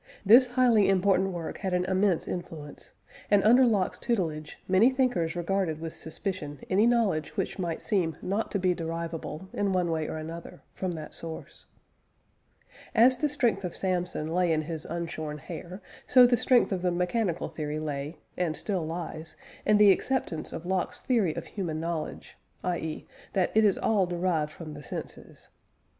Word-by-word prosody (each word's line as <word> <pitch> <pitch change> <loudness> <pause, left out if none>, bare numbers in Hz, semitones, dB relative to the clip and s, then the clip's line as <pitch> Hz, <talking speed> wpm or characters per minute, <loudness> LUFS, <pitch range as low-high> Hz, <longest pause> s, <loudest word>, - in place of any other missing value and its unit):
This 240 +6 +8
highly 245 -5 +4
important 195 0 +3
work 175 -3 -5
had 190 -3 -2
an 180 0 +1
immense 190 -1 +1
influence, 160 -4 -7 0.4
and, 205 -1 +4
under 245 +4 +6
Locke's 200 -5 +1
tutelage, 160 -10 -2
many 190 +6 +5
thinkers 245 -12 0
regarded 175 -2 -1
with 165 0 -5
suspicion 155 -4 -4
any 205 +5 +4
knowledge 220 -10 +1
which - - -2
might 170 -3 -3
seem 170 -8 0
not 200 +4 -2
to - - -1
be 185 -1 +2
derivable, 165 0 -5
in 200 -1 0
one 180 -2 +1
way 160 -1 -1
or - - -4
another, 165 +2 -8
from 185 -2 -3
that 155 -2 -7
source. 165 -1 -8 1.3
As 245 +3 +6
the 300 +3 +1
strength 240 -8 +1
of 180 - -4
Samson 180 -4 -1
lay 180 -1 +2
in 155 -1 +1
his 160 0 -5
unshorn 165 -3 -4
hair, 175 +5 -8 0.2
so 250 -1 +8
the 245 0 +4
strength 245 0 +3
of 185 -2 -1
the 180 - +1
mechanical 180 +1 0
theory 150 -1 -4
lay, 150 0 -4 0.2
and 170 -4 -1
still 190 -5 -2
lies, 160 -1 -6 0.3
in 210 - +6
the 205 -1 +8
acceptance 190 -6 -1
of 165 - -6
Locke's 185 0 -1
theory 220 - +1
of - - -5
human 170 -6 -4
knowledge, 165 -1 -5 0.3
i.e. 160 -3 -3 0.3
that 185 -3 +1
it 220 - +5
is 205 -3 +4
all 200 -4 +2
derived 175 -3 0
from 155 -1 -9
the 145 - -9
senses. - - -8
180 Hz, 170 wpm, -28 LUFS, 160-200 Hz, 1.3 s, This